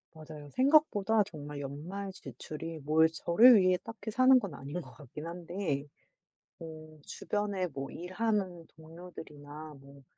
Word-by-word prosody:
맞아요. 155 Hz, -2 st, -10 dB
생각보다 255 Hz, -, +4 dB
정말 150 Hz, -6 st, -8 dB
연말 165 Hz, +9 st, -6 dB
지출이 160 Hz, -2 st, -8 dB
뭘 155 Hz, +3 st, +4 dB
저를 210 Hz, +10 st, +6 dB
위해 185 Hz, -1 st, +4 dB
딱히 225 Hz, -1 st, -7 dB
사는 255 Hz, +3 st, +6 dB
건 200 Hz, -9 st, -6 dB
아닌 140 Hz, +5 st, -6 dB
것 -, -, -13 dB
같긴 150 Hz, +2 st, -9 dB
한데 170 Hz, -4 st, -3 dB, 0.7 s
뭐 155 Hz, -1 st, -10 dB
주변에 205 Hz, -3 st, -2 dB
어 135 Hz, -1 st, -5 dB
일하는 185 Hz, -2 st, -2 dB
동료들이나 155 Hz, -2 st, -11 dB
뭐 140 Hz, 0 st, -16 dB
165 Hz, 265 characters per minute, -31 LUFS, 150-200 Hz, 0.7 s, 저를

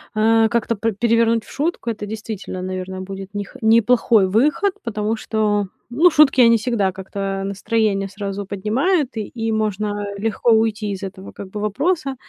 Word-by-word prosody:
э, 225 Hz, +1 st, +4 dB
как-то 235 Hz, -1 st, 0 dB
пре 220 Hz, +1 st, -1 dB
перевернуть 230 Hz, +1 st, +2 dB
в -, -, -14 dB
шутку. 300 Hz, -4 st, -2 dB
Это 210 Hz, -2 st, -4 dB
действительно, 215 Hz, -3 st, -6 dB
наверное, 185 Hz, 0 st, -5 dB
будет 195 Hz, +1 st, -8 dB
нех 205 Hz, +4 st, -5 dB
неплохой 225 Hz, -2 st, +4 dB
выход, 295 Hz, -, +2 dB
потому 215 Hz, 0 st, -2 dB
что, 210 Hz, -2 st, 0 dB, 0.2 s
ну, 310 Hz, +9 st, +5 dB
шутки, 290 Hz, -4 st, +5 dB
они 230 Hz, -1 st, +6 dB
всегда 215 Hz, -4 st, 0 dB
как-то 195 Hz, +1 st, -4 dB
настроение 200 Hz, 0 st, 0 dB
сразу 200 Hz, 0 st, -5 dB
поднимают, 255 Hz, -, 0 dB
и 215 Hz, -, -3 dB
и 225 Hz, -1 st, -3 dB
можно 210 Hz, -1 st, -1 dB
легко 225 Hz, +3 st, 0 dB
уйти 220 Hz, -1 st, +1 dB
из 195 Hz, 0 st, -6 dB
этого, 190 Hz, 0 st, -8 dB
как 195 Hz, -2 st, -9 dB
бы, 210 Hz, -, -5 dB
вопроса. 275 Hz, -, -1 dB
215 Hz, 160 wpm, -20 LUFS, 200-230 Hz, 0.2 s, они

